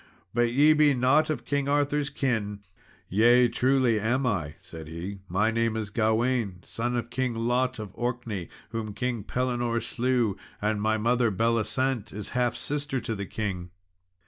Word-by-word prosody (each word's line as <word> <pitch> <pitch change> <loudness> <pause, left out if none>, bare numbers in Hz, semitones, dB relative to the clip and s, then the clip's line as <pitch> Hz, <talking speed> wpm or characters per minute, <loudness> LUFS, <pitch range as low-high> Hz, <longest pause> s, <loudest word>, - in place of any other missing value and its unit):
But 120 0 +2
ye 145 +5 +6
be 150 -2 +4
not 130 +6 +3
of 150 -6 -2
King 140 -1 0
Arthur's 145 0 +1
kin." 105 -8 -1 0.5
"Yea, 120 +5 +5
truly 130 -3 +2
am 125 +6 +1
I," 80 -10 -1
said 80 -2 -10
he; 90 +5 -6
"my 105 +5 +2
name 115 -1 0
is 105 -2 -4
Gawain, 110 -3 +1
son 120 +2 -2
of 120 -1 -3
King 130 -2 -1
Lot 125 +2 0
of 105 -3 -6
Orkney, 120 -6 -3 0.2
whom 110 -2 -4
King 125 -4 -2
Pellinore 120 0 -1
slew 120 -3 0 0.2
and 105 0 0
my 110 +1 +2
mother, 120 +2 +2
Belisent, 115 +2 0
is 105 0 -5
half 125 -1 0
sister 145 -2 -2
to 115 - -3
the 100 -2 -5
king." 95 -5 -4
115 Hz, 160 wpm, -27 LUFS, 105-130 Hz, 0.5 s, ye